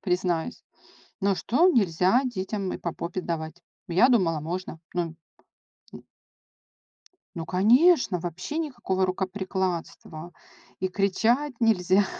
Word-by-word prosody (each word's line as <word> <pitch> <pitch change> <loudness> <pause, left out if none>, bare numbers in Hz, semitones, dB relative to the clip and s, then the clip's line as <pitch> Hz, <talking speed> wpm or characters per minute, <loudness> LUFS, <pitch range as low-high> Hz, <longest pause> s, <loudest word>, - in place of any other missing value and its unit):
признаюсь, 180 +1 -1 0.6
ну, 200 -1 +2
что 310 - +3
нельзя 195 - +3
детям 195 -4 -3
и - - -4
по 170 - -4
попе 180 +2 -4
давать? 160 0 -5 0.3
Я 185 +9 +5
думала, 175 -10 +2
можно, 165 +1 -5
ну, 170 -2 -2 0.8
м - - -11 1.3
Ну, 165 - -3
конечно, 230 - +4
вообще 175 - -5
никакого 240 -12 -1
рукоприкладства, 185 -3 -3 0.5
и 185 - 0
кричать 225 +9 +1
нельзя. 195 -3 +3
185 Hz, 110 wpm, -26 LUFS, 175-225 Hz, 1.3 s, Я